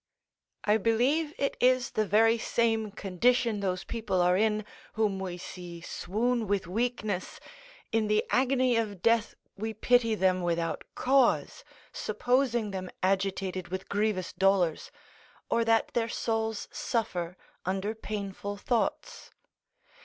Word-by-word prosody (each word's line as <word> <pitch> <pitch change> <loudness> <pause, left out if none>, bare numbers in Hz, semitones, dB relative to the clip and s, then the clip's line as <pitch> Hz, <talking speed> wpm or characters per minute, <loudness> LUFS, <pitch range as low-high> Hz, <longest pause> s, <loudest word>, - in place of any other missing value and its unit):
I 210 +1 +4
believe 250 +9 +2
it 275 - 0
is 255 -1 +3
the 215 -1 0
very 225 +3 +4
same 225 -2 +1
condition 215 +3 +1
those 185 -2 -1
people 220 -5 -2
are 180 0 +4
in, 215 +1 +1 0.3
whom 210 -3 0
we 185 -2 -4
see 175 -1 -8
swoon 225 +7 -1
with 200 -1 0
weakness 215 -1 -2 0.5
in 220 -1 +1
the 210 0 +2
agony 255 -2 +3
of 205 -5 -2
death 230 -1 +2 0.2
we 220 +2 -4
pity 230 0 +3
them 185 -2 +2
without 170 -1 -1
cause, 260 -1 +2 0.3
supposing 245 -4 0
them 185 -1 -5
agitated 190 -1 0
with 190 +1 -6
grievous 205 -3 0
dolours, 190 -4 +2 0.6
or 230 - +3
that 225 0 +2
their 230 -1 0
souls 225 -2 -2
suffer 185 -7 -2 0.3
under 190 +3 -1
painful 205 -2 -5
thoughts. 465 - -2
215 Hz, 125 wpm, -29 LUFS, 190-230 Hz, 0.6 s, I